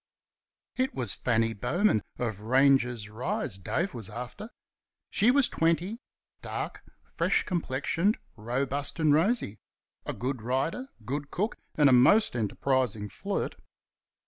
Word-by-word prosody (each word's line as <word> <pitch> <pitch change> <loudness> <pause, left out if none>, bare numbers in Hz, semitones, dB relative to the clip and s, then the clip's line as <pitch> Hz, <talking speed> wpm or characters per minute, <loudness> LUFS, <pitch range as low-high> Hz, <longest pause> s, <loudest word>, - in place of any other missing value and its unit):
It 260 +1 0
was 120 -7 0
Fanny 115 -2 +1
Bowman, 175 - +2 0.2
of 110 -5 -2
Ranger's 125 -1 +3
Rise, 105 -3 -3
Dave 170 - -1
was 110 -4 -6
after. 125 - -7 0.6
She 215 +5 +4
was 270 0 +5
twenty, 170 +7 0 0.4
dark, - - -5 0.3
fresh - - +2
complexioned, 170 - 0 0.2
robust 135 +7 -2
and 155 -2 +4
rosy 160 - +1 0.5
a - - -2
good 130 0 -3
rider, 135 - -1 0.2
good 140 +4 -3
cook, 210 +9 -1 0.2
and 150 -2 +5
a - - +6
most 130 - +5
enterprising 115 -1 0
flirt. 200 - -3
135 Hz, 120 wpm, -28 LUFS, 115-175 Hz, 0.6 s, a